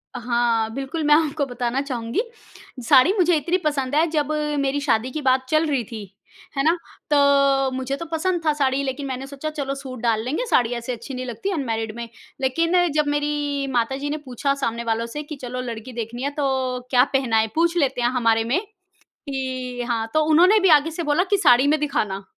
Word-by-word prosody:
हाँ, 235 -2 0
बिल्कुल 275 +4 -4
मैं 295 - +4
आपको 305 -2 +1
बताना 245 +1 -2
चाहूँगी, 245 - -2 0.6
साड़ी 265 +9 +5
मुझे 355 -4 +3
इतनी 345 +5 0
पसंद 285 -2 0
है 315 - +4
जब 305 -2 -1 0.3
मेरी 275 +1 0
शादी 245 -2 +1
की 310 - -4
बात 260 -1 +2
चल 310 +2 +3
रही 270 -4 0
थी। 210 -3 -9 0.5
है 275 - +2
ना? 325 +3 +4 0.4
तो 275 -2 +4
मुझे 260 +1 -3
तो 335 - -6
पसंद 345 +2 0
था 305 - +4
साड़ी 275 -1 +1
लेकिन 270 +1 -3
मैंने 265 +1 -5
सोचा 280 +2 -5
चलो 280 -3 -4
सूट 265 -2 -8
डाल 225 -2 +1
लेंगे 310 - -2
साड़ी 245 - +2
ऐसे 240 +1 -4
अच्छी 235 +4 -8
नहीं 255 0 -4
लगती 245 - -4
अनमैरिड 225 -7 -3
में। 235 0 -6 0.3
लेकिन 330 +7 +2
जब 300 -1 +1
मेरी 290 -1 -1
माताजी 265 +4 -1
ने 305 - -2
पूछा 265 +2 -1
सामने 235 -4 -2
वालों 230 0 -1
से 295 +6 -6
कि 300 +1 -8
चलो 250 0 -4
लड़की 240 0 -7
देखनी 235 +2 -5
है, 280 - 0
तो 265 -3 -1
क्या 250 -1 +5
पहनाएँ 240 -5 +2
है 220 -1 -3
पूछ 335 +2 +2
लेते 270 -5 +1
हैं 240 - +2
हमारे 230 -3 +2
में? 255 +10 +1 0.7
कि 255 -2 -4
हाँ, 225 -1 -1
तो 310 0 +3
उन्होंने 365 +7 +6
भी 385 - +3
आगे 305 +1 +5
से 335 +2 -4
बोला 300 +3 +2
की 405 - +3
साड़ी 265 -6 +5
में 305 +1 +3
दिखाना। 205 -9 -2
270 Hz, 205 wpm, -22 LUFS, 245-300 Hz, 0.7 s, उन्होंने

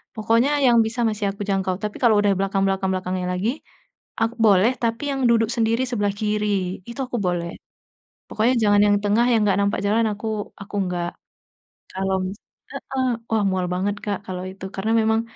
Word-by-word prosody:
pokoknya 230 +5 +2
yang 240 -2 +5
bisa 230 +2 -3
masih 210 -1 -3
aku 200 - -11
jangkau, 190 -1 0
tapi 210 0 -3
kalau 235 -4 +5
udah 205 -1 +3
belakang 195 0 0
belakang 195 0 0
belakangnya 185 0 -2
lagi, 185 +5 0 1.0
boleh, 205 +2 +5
tapi 230 +3 -1
yang 270 -1 -2
duduk 225 -1 +3
sendiri 230 +1 +1
sebelah 205 -4 0
kiri 210 0 0 0.4
itu 235 - -9
aku 245 - -3
boleh, 175 -1 -1 0.8
pokoknya 225 +4 +2
jangan 205 -1 +4
yang 205 0 +4
tengah, 210 +3 +3
yang 225 - +4
enggak 200 -1 +2
nampak 200 0 0
jalan, 220 +3 +2
aku 210 +2 -7 0.4
aku 200 - -12
enggak. 175 -2 -2 0.8
Kalo 190 0 -2
mis 190 +2 -5 0.4
heeh, 260 -1 -3 0.2
wah, 220 -2 +1
mual 185 -1 -1
banget, 195 +3 -1
Kak, 205 -2 -1
kalau 180 -1 -4
itu 190 0 -9
karena 215 +3 -1
memang 220 0 +2
205 Hz, 175 wpm, -22 LUFS, 195-225 Hz, 1.0 s, yang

